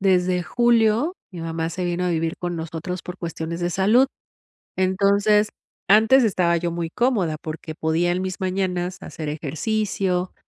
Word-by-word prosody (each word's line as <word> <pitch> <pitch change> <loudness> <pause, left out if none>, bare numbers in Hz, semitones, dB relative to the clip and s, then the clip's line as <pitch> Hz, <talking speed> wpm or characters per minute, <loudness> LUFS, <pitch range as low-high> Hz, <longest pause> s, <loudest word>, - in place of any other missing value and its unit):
desde 180 -2 +2
julio 235 - +2 0.2
mi 175 - -8
mamá 165 0 -3
se 180 +2 -4
vino 175 +1 -1
a 180 - +1
vivir 165 0 -1
con 175 -1 -4
nosotros 165 +3 -5
por 180 - -7
cuestiones 170 -1 -5
de 175 0 0
salud. 215 +9 +4 0.7
Entonces 200 +3 +3 0.4
antes 225 +6 +6
estaba 180 -5 +2
yo 170 0 -2
muy 170 -1 -3
cómoda 200 -7 +1
porque 160 +1 -6
podía, 165 +2 +1
en 180 - -1
mis 185 +1 -4
mañanas, 185 -1 -1
hacer 155 -4 -7
ejercicio. 180 +4 -1
180 Hz, 155 wpm, -23 LUFS, 170-200 Hz, 0.7 s, antes